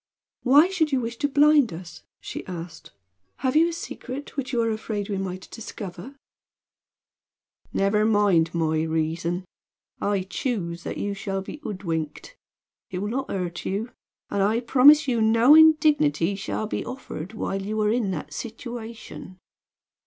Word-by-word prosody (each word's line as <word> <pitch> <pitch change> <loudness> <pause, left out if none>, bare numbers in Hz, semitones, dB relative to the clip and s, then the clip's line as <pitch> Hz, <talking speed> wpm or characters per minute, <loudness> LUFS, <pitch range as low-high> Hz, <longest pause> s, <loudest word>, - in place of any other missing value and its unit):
"Why 285 +6 +6
should 345 -5 0
you 265 - +2
wish 235 -1 -4
to 285 - +1
blind 290 -3 +5
us?" 165 -1 -9 0.2
she - - -7
asked. 165 -3 -8 0.5
"Have 260 0 0
you 325 +2 +6
a - - -3
secret 285 -4 -7
which 275 -2 -3
you 240 - 0
are 225 - +1
afraid 215 -2 -4
we 200 -2 -2
might 185 -1 -5
discover?" 210 +2 -8 1.6
"Never 200 +2 +2
mind 205 -7 +3
my 160 -2 0
reason. 165 +3 -1 0.6
I 200 -2 0
choose 185 -4 -3
that - - -4
you 205 0 -2
shall 195 -1 -3
be 195 - -8
hoodwinked. 185 - -5 0.5
It 185 - -5
will 205 +3 -2
not 265 +3 -3
hurt 180 -3 -3
you; 210 +6 -3 0.4
and 200 - 0
I 215 +4 +2
promise 275 +5 +6
you 240 -3 +1
no 230 +5 +6
indignity 305 - +5
shall 195 +2 -3
be 215 - -3
offered 220 -8 -7
while 195 -2 -3
you 215 +2 -3
are 210 0 +2
in 230 -3 0
that 175 -5 -5
situation." 230 -4 -8
215 Hz, 155 wpm, -25 LUFS, 185-255 Hz, 1.6 s, Why